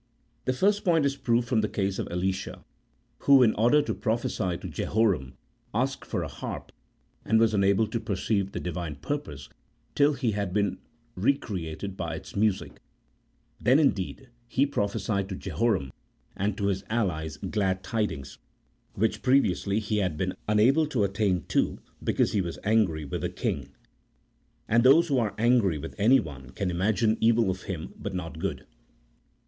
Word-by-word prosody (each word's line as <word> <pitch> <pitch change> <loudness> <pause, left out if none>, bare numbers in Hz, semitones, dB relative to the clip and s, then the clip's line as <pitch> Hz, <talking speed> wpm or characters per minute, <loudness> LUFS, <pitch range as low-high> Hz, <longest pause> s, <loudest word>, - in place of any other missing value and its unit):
The 130 - +1
first 205 +9 +2
point 165 -5 +3
is 140 -1 +1
proved 120 -3 +1
from 115 -3 +2
the 105 - -1
case 95 -1 -1
of - - -2
Elisha, 95 +2 -3 0.5
who, 140 -2 +6
in 110 - +4
order 120 +7 +4
to - - -2
prophecy 110 -6 -1
to - - -7
Jehoram, 100 - 0 0.4
asked - - -1
for - - -2
a - - -3
harp, - - -7 0.5
and 110 +1 +3
was 115 -1 +3
unable 100 +1 +3
to 115 +2 -3
perceive 100 -2 -1
the - - -4
Divine 85 -3 -4
purpose 75 - -5 0.5
till 145 +1 +4
he 125 -5 0
had 100 -3 -2
been 100 -2 0 0.3
re 125 +9 +2
created 95 - -5
by 80 -1 -3
its - - -10
music; 100 -1 0 0.8
then, 130 +3 +5
indeed, 135 -2 0 0.2
he 130 +4 +2
prophesied 100 -5 -1
to 95 - -4
Jeho 115 +5 0
ram 70 -9 -3 0.4
and 100 +1 -1
to 100 - -1
his 95 -1 0
allies 80 -9 -1
glad 95 +2 -1
tidings, 105 - -3 0.6
which 105 0 0
previously 105 -6 +2
he 105 0 -1
had 90 -7 0
been 95 +3 -1
unable 125 +9 +4
to 125 -8 0
attain 95 -2 0
to - - +1 0.3
because - - +1
he 100 - +1
was 85 -2 -4
angry 100 -8 +2
with 70 - -4
the - - -1
king, - - -3 1.0
and 115 +2 +4
those 160 +6 +6
who 135 -3 +3
are 110 -4 -1
angry 115 -7 +3
with 80 +3 -7
anyone 80 - +2
can 90 +8 -2
imagine 110 +5 +1
evil 115 -3 +4
of 95 0 -6
him, 85 -4 -5
but 100 -2 -5
not 85 -3 -5
good. - - -3
105 Hz, 165 wpm, -27 LUFS, 95-120 Hz, 1.0 s, who